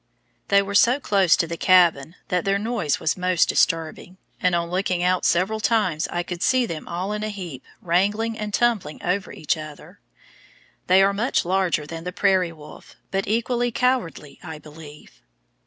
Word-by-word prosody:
They 200 0 +4
were 200 +1 -6
so 240 +6 +4
close 195 - +3
to 175 - +1
the 170 0 -6
cabin 170 -5 +3
that 180 -1 0
their 195 0 +1
noise 210 -8 -1
was 155 - 0
most 180 -1 +1
disturbing, 165 +2 -1 0.2
and 180 -1 +2
on 170 0 -2
looking 180 -1 -1
out 180 0 +1
several 190 +5 +1
times 210 -8 +1
I 175 - -3
could 175 0 -7
see 255 +4 +2
them 165 -8 -7
all 180 +4 -3
in 210 - -4
a 215 - -2
heap 175 -10 -8 0.2
wrangling 205 +6 0
and 210 -1 -5
tumbling 210 -9 0
over 185 +2 -1
each 155 - -1
other. 155 -1 -11 0.9
They 190 +1 +5
are 200 +1 +2
much 225 +2 0
larger 180 -4 0
than 165 +2 -8
the 180 - -4
prairie 185 -2 +1
wolf, 150 -2 -14 0.2
but 195 0 -2
equally 235 +3 0
cowardly, 220 - -1
I 160 -3 -8
believe. 150 0 -14
185 Hz, 175 wpm, -23 LUFS, 165-205 Hz, 0.9 s, They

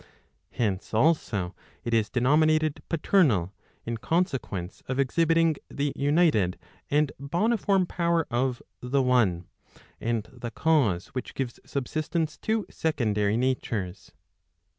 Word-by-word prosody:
Hence 105 -2 -2
also 110 - +1 0.3
it 120 - -2
is 110 -2 +2
denominated 155 +4 +2
paternal, 145 - +2 0.3
in 115 0 -3
consequence 130 - -2
of 130 - -2
exhibiting 165 +3 +2
the 140 0 -2
united 145 - +2 0.3
and 145 0 +2
boniform 190 +5 +1
power 170 -2 +1
of 125 +1 0 0.2
the 130 +2 +1
one, 110 -9 +2 0.5
and 115 -2 -1
the 120 -1 -6
cause 120 - +1
which 130 - -6
gives 130 -3 -3
subsistence 155 +4 -2
to 220 -1 -1
secondary 105 -9 0
natures. 115 -7 -2
135 Hz, 110 wpm, -27 LUFS, 115-160 Hz, 0.5 s, is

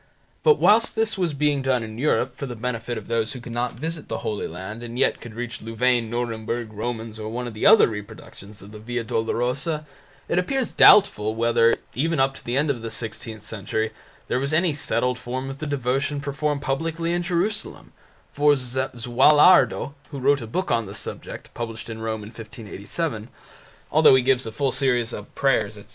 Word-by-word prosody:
But 455 -2 +5
whilst 225 +3 +4
this 225 0 +1
was 175 -6 -1
being 145 -1 +1
done 130 -3 +1
in 110 0 -8
Europe 130 -3 +1
for 140 - -5
the 120 - -6
benefit 120 0 -3
of 110 - -8
those 115 -1 -1
who 130 - -7
could 120 0 -9
not 120 +1 -1
visit 155 +5 -5
the 115 - -5
Holy 105 - -2
Land 95 +7 -7
and 120 0 -7
yet - - +2
could 115 -2 -10
reach 120 -1 -5
Louvain, 115 +1 +1
Nuremburg, 115 -1 -3
Romans, 110 0 -5
or 110 0 -5
one 125 +2 -4
of 120 - -6
the 110 - +1
other 220 +2 +8
reproductions 105 -1 -9
of 100 - -12
the 105 - -10
Via 120 +2 -3
Dolorosa, 125 +8 -1 0.4
it 175 - +1
appears 260 +6 -1
doubtful 110 - +6
whether, 115 0 +3 0.2
even 160 +3 0
up 135 0 +3
to - - -12
the 120 +2 -2
end 145 +1 +2
of 120 -4 -5
the 115 - -5
sixteenth 110 -1 -7
century, 110 +1 -3 0.4
there - - 0
was 140 +3 -2
any 170 0 +3
settled 125 -3 -1
form 130 +2 -4
of 135 - -9
the 155 - -4
devotion 140 +1 -1
performed 140 +1 -2
publicly 165 +4 -1
in 175 - 0
Jerusalem, 180 +5 -2 0.4
for 145 0 +4
Zuallardo, 130 +5 +3 0.2
who 145 - -7
wrote 140 +1 +2
a 115 - -6
book 185 +12 -2
on 115 -3 +1
the 100 - -8
subject, 110 - -7
published 115 -1 -6
in 110 0 -7
Rome 110 -1 -3
in 105 - -9
1587, 110 - -5 0.6
although 155 -3 +7
he 130 - +3
gives 130 -1 +2
a - - -4
full 135 +3 0
series 125 -3 +1
of 105 - -9
prayers, 110 -6 +1
etc. 100 - -14
125 Hz, 195 wpm, -24 LUFS, 115-145 Hz, 0.6 s, other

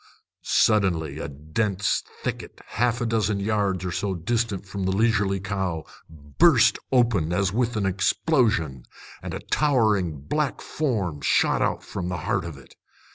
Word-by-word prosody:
Suddenly 85 -8 +2
a 70 - -4
dense 90 +8 -1 0.2
thicket, - - -5
half 120 +2 0
a - - 0
dozen 110 -3 0
yards 100 -3 0
or 90 - -2
so 95 +1 -2
distant 105 +2 -1
from 95 0 -4
the 95 - +1
leisurely 100 -2 +2
cow, 95 -5 -3 0.2
burst 75 -4 +3
open 115 -11 +2
as 95 +1 +1
with 120 +1 0
an 100 - 0
explosion, 100 - +1 0.4
and - - -5
a - - -4
towering 105 - +1
black 150 - -1
form 100 - -2
shot - - +2
out - - 0
from 90 -2 -5
the 90 - -2
heart - - 0
of 85 -5 -7
it. 70 - -16
100 Hz, 150 wpm, -25 LUFS, 85-115 Hz, 0.4 s, burst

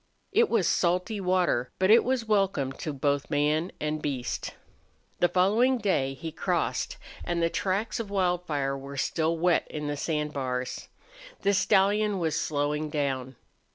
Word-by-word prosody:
It 460 0 +3
was 210 -7 +2
salty 180 +4 +1
water, 180 -9 +1
but 185 +2 +3
it 230 - +7
was 255 -2 0
welcome 195 -10 +1
to 155 +3 -5
both 140 0 -1
man 150 +3 +1
and 150 0 -2
beast. 130 -4 -3 0.6
The 175 - +4
following 215 +9 +3
day 140 - 0
he 160 +5 -6
crossed, - - -1 0.3
and 175 0 -1
the 165 0 +1
tracks 200 +4 -1
of 225 -3 -4
Wildfire 175 -8 0
were 140 +1 -8
still 160 +4 0
wet 175 +1 +2
on 150 -1 -4
the 145 0 -2
sand 150 0 -2
bars. 125 -2 -3 0.5
The 200 - +2
stallion 205 +1 +3
was 160 -4 -1
slowing 150 +1 -1
down. 135 -3 -2
165 Hz, 155 wpm, -27 LUFS, 145-195 Hz, 0.6 s, it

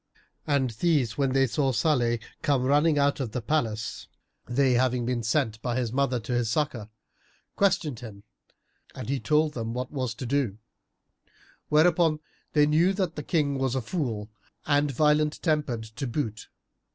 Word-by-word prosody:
And 140 -4 +1
these 130 -3 +1
when 135 -2 0
they 135 0 +4
saw 135 +2 0
Salih 120 -2 +2 0.2
come 140 -4 +1
running 145 +3 +3
out 140 0 +2
of 120 -6 -4
the - - -1
palace 115 -6 -2 0.4
(they 130 +1 +2
having 125 -1 +1
been 125 -1 -1
sent 115 -2 0
by 120 -2 -2
his 120 -3 -2
mother 130 -2 +1
to 115 +3 -4
his 120 -2 0
succour), 120 -5 -1 0.7
questioned 165 - +1
him 105 -5 -10 0.7
and 125 -2 -6
he 140 0 0
told 150 +6 +2
them 115 -2 -4
what 125 0 -4
was 130 -6 -3
to 130 - -6
do; 125 -5 0 1.1
whereupon 160 0 +4 0.3
they 150 -1 +5
knew 165 +6 +3
that 185 -4 -2
the 150 - -4
King 145 -2 0
was 130 -1 0
a - - +1
fool 115 - -3 0.3
and 145 0 +2
violent 150 +2 +2
tempered 150 -8 0
to 110 +5 -6
boot. 115 -4 -4
135 Hz, 165 wpm, -27 LUFS, 120-150 Hz, 1.1 s, they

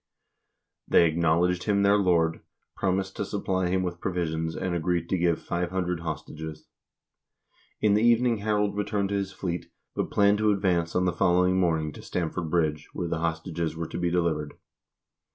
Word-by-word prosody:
They - - +5
acknowledged 85 +2 +1
him 100 -2 +2
their 100 +1 +5
lord, 85 -5 +2 0.3
promised 95 0 -1
to - - -1
supply 95 -2 -1
him 95 +1 +1
with 85 -1 -4
provisions, 80 -3 -2
and 95 -1 -2
agreed 85 0 0
to 95 - +1
give 85 -1 +2
500 90 0 -2
hostages. 80 -1 -6 1.2
In 105 -1 +4
the 105 - +3
evening 120 0 +4
Harald 105 -1 0
returned 105 -1 -1
to 100 - -1
his 100 -1 -2
fleet, 90 -3 -4 0.2
but - - -2
planned 100 0 +3
to 110 0 +3
advance 90 -4 0
on 90 - +2
the 90 - +1
following 90 0 +3
morning 80 -4 +1
to - - -11
Stamford 85 -1 -3
Bridge, 75 -2 0
where 90 - -3
the 85 - -1
hostages 80 -1 -2
were 85 0 -4
to - - -5
be 90 0 +1
delivered. 85 -4 -1
90 Hz, 170 wpm, -27 LUFS, 85-95 Hz, 1.2 s, They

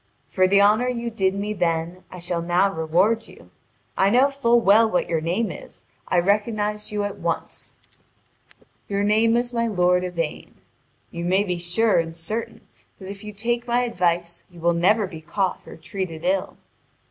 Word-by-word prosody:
For 185 -1 +2
the 200 +1 +5
honour 215 +4 +4
you 235 -1 -3
did 195 -3 0
me 205 +1 -3
then 175 -1 -2
I 185 - -10
shall 175 -1 -3
now 180 +3 +2
reward 180 +8 +1
you. - - -17 0.4
I 195 - +3
know 255 +6 +4
full 240 -4 +3
well 220 +1 +5
what 180 - 0
your 165 -2 -1
name 180 +8 -1
is, - - -11 0.3
and 175 -1 +2
I - - -8
recognised 210 +1 0
you 210 -1 -1
at 205 -1 -5
once: 170 -1 -4 1.1
your 200 0 0
name 220 +3 +3
is 240 0 -2
my 230 0 0
lord 180 -3 +2
Yvain. 170 -4 -4 0.6
You 170 - -5
may 185 +3 +2
be 180 -3 -3
sure 180 +5 +2
and 165 0 -4
certain 215 +8 -4 0.4
that 190 0 -8
if 200 +1 -10
you 210 - -7
take 235 +4 -2
my 240 +1 +2
advice 175 -7 -1
you 175 -1 -15
will 170 +1 +2
never 200 +6 +3
be 165 -4 -9
caught 185 +3 -2
or - - -10
treated 165 -1 -6
ill. 185 +1 -1
195 Hz, 180 wpm, -23 LUFS, 175-220 Hz, 1.1 s, the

